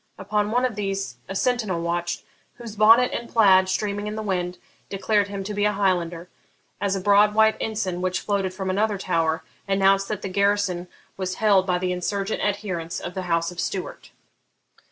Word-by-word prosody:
Upon 210 +1 -1
one 245 +3 +2
of 245 -4 -2
these 195 -10 -3
a 195 - -4
sentinel 220 -6 0
watched, 175 +1 -2 0.3
whose 230 -3 -9
bonnet 225 +4 +6
and 235 - -4
plaid, 190 -4 +5
streaming 205 +1 -2
in 210 - -4
the 220 - -4
wind, 180 -3 -2 0.3
declared 200 +1 +1
him 200 -1 -5
to 210 +2 -5
be 205 0 -1
a 210 - +2
Highlander, 175 -4 0 0.5
as 200 -1 0
a - - -1
broad 205 +2 +4
white 220 0 +5
ensign, 195 -5 -2
which 185 0 0
floated 200 -2 -1
from 190 0 -3
another 205 +2 +1
tower, 165 -4 0 0.2
announced 195 0 +3
that 210 -2 -4
the - - -2
garrison 200 -2 +1 0.3
was 185 -1 -3
held 200 -3 +3
by 180 -1 +2
the 180 0 -1
insurgent 195 +3 -2
adherents 190 -5 -2
of 175 - -6
the 190 - -3
House 170 0 +1
of 180 - -10
Stuart. 185 0 -4
195 Hz, 185 wpm, -24 LUFS, 185-210 Hz, 0.5 s, bonnet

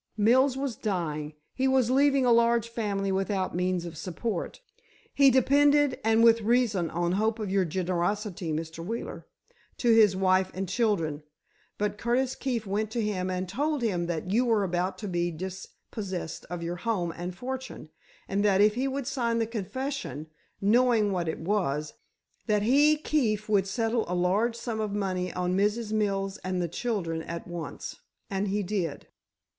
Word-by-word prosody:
Mills 255 +5 +4
was 270 -4 -2
dying; 155 -7 -3 0.2
he 265 0 +1
was 260 -2 +3
leaving 275 0 +4
a 245 - +4
large 235 0 +4
family 200 -4 -2
without 190 -1 -1
means 180 -1 0
of 170 -1 -7
support. 180 +4 -4 0.5
He 280 -1 +6
depended, 285 +2 +4
and 225 +1 +4
with 230 0 +6
reason, 215 -6 +2
on 175 +2 -1
hope 215 +4 +1
of 210 -4 -4
your 195 -1 +2
generosity, 180 +1 -2
Mr. 160 +1 -4
Wheeler, 225 +6 -5 0.5
to 235 -2 +3
his 215 -4 +6
wife 185 0 +2
and 190 +1 -3
children. 180 -7 0 0.6
But 205 0 -2
Curtis 250 +2 +1
Keefe 245 -6 -2
went 205 +2 -1
to 235 - 0
him 190 -3 -1
and 185 0 -2
told 285 - -1
him 180 -6 0
that 170 +1 -3
you 235 +5 +3
were 225 -4 +2
about 180 0 -1
to 210 - -6
be 175 -2 0
dispossessed 185 +1 -6
of 175 -1 -5
your 175 +1 -3
home 180 -5 -1
and 175 +1 -5
fortune, 260 -9 -6 0.4
and 200 +1 0
that 200 -2 +3
if 210 +1 +5
he 255 +4 -1
would 270 0 -3
sign 235 -3 0
the 230 - +1
confession—knowing 225 - -1
what 175 -3 -1
it 160 - -2
was—that 190 +4 -2
he, 290 +6 +5
Keefe, 230 -9 0
would 200 -3 +2
settle 225 +3 0
a 180 - -2
large 200 +7 +1
sum 235 -2 -4
of 210 -2 -2
money 185 -3 -1
on 180 0 -1
Mrs. 210 +3 0
Mills 195 -2 0
and 185 0 -3
the 175 - 0
children 170 -4 -2
at 170 +2 -6
once. 175 -2 -6 0.3
And 195 +1 -1
he 205 +1 0
did." 180 -6 -3
205 Hz, 165 wpm, -28 LUFS, 180-235 Hz, 0.6 s, He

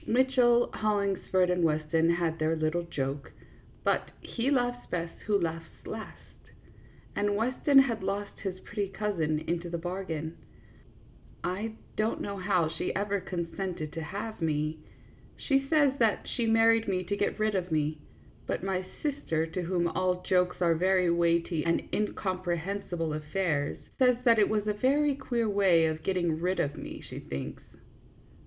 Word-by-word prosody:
Mitchell, 245 -1 +4
Hollings 200 -3 +1
ford, 185 -1 +4
and 180 -1 +1
Weston 160 +1 +2
had 170 -1 +1
their 155 +1 +2
little 155 +2 0
joke; 140 -4 -4 0.5
but - - +1
"he 240 +3 -2
laughs 245 -3 0
best 170 -1 -2
who 205 -2 +3
laughs 165 -1 -3 0.2
last," - - -9 0.8
and 205 0 +1
Weston 255 +6 +2
has 245 -6 +5
lost 200 +1 -3
his 185 -2 -4
pretty 205 -2 -3
cousin 190 -6 -1
into 170 +2 -2
the 170 - -2
bargain. 170 -2 -4 1.1
I 200 +5 -2 0.2
don't 215 +1 0
know 200 0 -4
how 180 -3 +2
she 165 +3 -3
ever 200 0 0
consented 175 -3 -4
to 165 - -4
have 205 +7 -5
me. 155 0 0 0.6
She 275 -1 +1
says 290 -4 +4
that 225 -3 +2
she 235 -3 0
married 225 0 +4
me 185 -2 0
to 200 +3 -2
get - - -1
rid 215 0 +2
of 180 -3 -1
me, 155 0 0 0.5
but - - -2
my 190 -1 -1 0.2
sister, 275 - 0
to 165 +3 -4
whom 175 0 0
all 180 +1 0
jokes 180 -1 +2
are 170 -1 +4
very 180 +1 +3
weighty 170 -1 +2
and 170 0 +2
incomprehen 185 -2 -2
sible 165 -3 -1
affairs, 150 -1 -1 0.2
says 250 -2 +5
that 230 -3 +5
it 205 - +4
was 215 -1 0
a 210 - +1
very 280 +7 +2
queer 240 -4 -1
way 195 -5 +4
of 160 0 -1
getting 175 -3 0
rid 185 +2 0
of 145 - 0
me, - - -8
she - - -7
thinks. 70 0 -6
185 Hz, 160 wpm, -29 LUFS, 165-215 Hz, 1.1 s, has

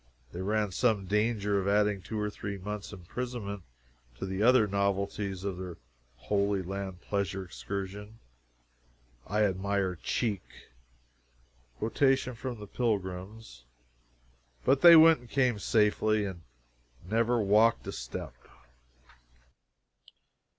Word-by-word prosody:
They 90 - -6
ran 105 +1 0
some 110 -1 +1
danger 105 0 +1
of 95 - -2
adding 105 -1 +2
two 110 +3 -5
or 105 0 -1
three 100 -1 -5
months' 105 +2 -6
imprisonment 100 +2 -5 0.6
to - - -4
the 95 +1 -3
other 125 0 +6
novelties 100 -1 -1
of 95 -3 -3
their 90 -2 -7 0.4
Holy 100 +4 0
Land 95 -1 -5
Pleasure 100 -1 -2
Excursion. 100 +4 -6 1.1
I 105 +1 +1
admire 100 -1 0
"cheek." 100 +2 -1 1.4
[Quotation 130 +3 +1
from 120 0 -6
the 105 - -7
Pilgrims.] 100 - -4 1.0
But 135 - +3
they 170 -1 +10
went 160 -2 +8
and 120 -1 -16
came 125 -5 +1
safely, 110 0 +2
and 95 -3 -6 0.7
never 115 +3 +2
walked 110 +3 +3
a - - -4
step. - - -6
105 Hz, 115 wpm, -30 LUFS, 95-110 Hz, 1.4 s, they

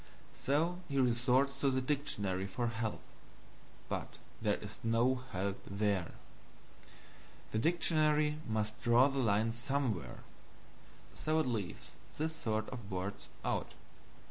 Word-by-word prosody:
So 165 +6 +1
he 140 -1 +1
resorts 130 +2 +3
to 140 - +3
the 130 0 +2
dictionary 105 -9 -1
for 120 +5 -2
help, 115 -2 -2 0.9
but - - -4 0.3
there - - +2
is - - -9
no 120 +3 +3
help 95 +1 -2
there. 100 -3 0 1.4
The 110 - +1
dictionary 155 0 +3
must 110 -1 -1
draw 125 +2 +6
the 135 0 -2
line 110 -1 +3
somewhere 120 - -2 0.9
so 155 +1 0
it 155 - +2
leaves 110 -8 -3 0.3
this 160 +1 -1
sort 110 -5 -1
of 115 -6 -7
words 95 +1 -4 0.2
out. - - -1
120 Hz, 120 wpm, -35 LUFS, 105-140 Hz, 1.4 s, draw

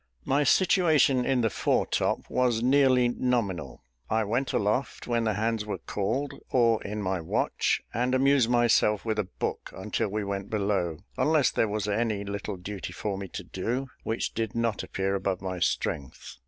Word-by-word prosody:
My 140 +2 +2
situation 155 -6 +4
in 130 -2 +2
the 115 - +2
fore - - +1
top - - -1
was 120 -3 +1
nearly 130 -1 +4
nominal. 120 - -2 0.3
I 110 0 +2
went 120 +6 -1
aloft 105 +6 -1
when 120 -1 0
the 110 - +1
hands 110 0 0
were 105 - -4
called, 115 +8 -2 0.2
or 115 -3 +3
in 105 +1 -4
my 95 -2 -1
watch, 80 - 0
and 125 +2 +1
amused 135 -2 +4
myself 115 -4 +3
with 110 -1 -1
a 105 - 0
book - - -3
until 105 +3 -2
we 105 +1 -2
went 100 -1 -4
below, 100 -6 0 0.2
unless 150 0 +3
there 115 - +1
was 105 0 -2
any 105 -1 0
little 100 0 -4
duty 95 +2 -6
for 105 -2 -3
me 95 0 -5
to - - -7
do, 125 +7 -3
which 110 +1 -2
did 115 -1 -3
not 115 -2 0
appear 95 0 -2
above 95 -1 -1
my 95 -1 -4
strength. 70 -6 -2
110 Hz, 175 wpm, -27 LUFS, 100-125 Hz, 0.3 s, situation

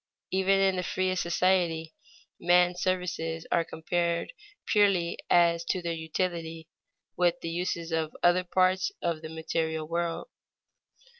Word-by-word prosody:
Even 190 +1 +3
in 190 -1 +2
the - - 0
freest 185 0 -1
society, 170 -2 +1 0.5
man's 180 0 +3
services 170 -3 -2
are 170 - +3
compared 170 - -2 0.3
purely 195 -5 +2
as 170 -1 +4
to 185 - 0
their 170 -1 -3
utility, 165 0 -3 0.5
with 175 -1 +2
the 165 - -4
uses 170 -1 -3
of 160 -1 -2
other 175 +1 +4
parts 185 - +2
of 170 -2 -1
the 160 - -7
material 160 -1 -2
world. 170 - -2
170 Hz, 130 wpm, -28 LUFS, 165-185 Hz, 0.5 s, as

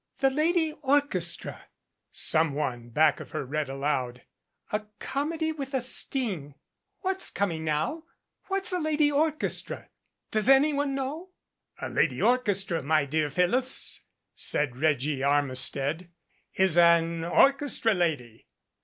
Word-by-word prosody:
" - - -49
'The 270 0 +4
Lady 320 +2 +1
Orchestra,' 265 - 0 0.4
some 160 -2 +2
one 120 -5 -3
back 150 +5 +3
of - - -9
her - - -3
read 145 +1 -3
aloud. 135 -3 -2 0.5
'A 210 - +1 0.2
Comedy 315 +6 -2
with 275 -3 -6
a - - +2
Sting 225 - 0
5 - - -40 0.5
What's 380 0 +1
coming 170 -6 -2
now? 160 - -2 0.4
What's 390 -1 -2
a 360 - 0
'Lady 305 -2 +1
Orchestra'? 305 +1 -1 0.4
Does 215 +3 +1
anyone 280 0 +3
know?" 290 +7 -5 0.5
"A - - -4
'Lady - - 0
Orchestra,' 200 -9 +1
my 155 +1 +1
dear 150 +1 -1
Phyllis," 195 - 0 0.3
said 145 -5 0
Reggie 145 -1 0
Armistead, 140 +3 0 0.5
"is 185 -3 +4
an 170 -1 +4
orchestra 270 - +3
lady." 150 - -2
180 Hz, 125 wpm, -27 LUFS, -, 0.5 s, The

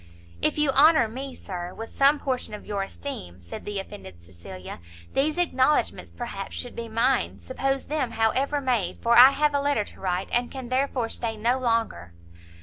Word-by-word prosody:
"If - - +1
you 300 -2 +3
honour 300 -2 +6
me, 260 +4 -6
Sir, 180 -2 -7
with 225 0 -8
some 280 +2 +5
portion 255 -6 -3
of - - -11
your 200 -1 -2
esteem," 195 - -6
said 85 -1 -9
the 205 -1 -4
offended 145 - -8
Cecilia, 90 +2 -10 0.3
"these 300 +4 +1
acknowledgments, 300 -5 +1
perhaps, 215 -5 -6
should 245 - -5
be 230 -1 -5
mine; 245 +4 +1
suppose 270 +1 -2
them, 295 -5 -1
however 260 +6 +1
made, 240 -10 0
for 235 0 +4
I 250 +2 +11
have 295 +1 +1
a 285 - +1
letter 285 -6 +1
to - - -13
write, 185 0 -2
and 240 0 +1
can 260 -3 -7
therefore 255 -2 0
stay 225 -1 -3
no 240 +4 +1
longer." 230 - -1
240 Hz, 180 wpm, -25 LUFS, 205-275 Hz, 0.3 s, I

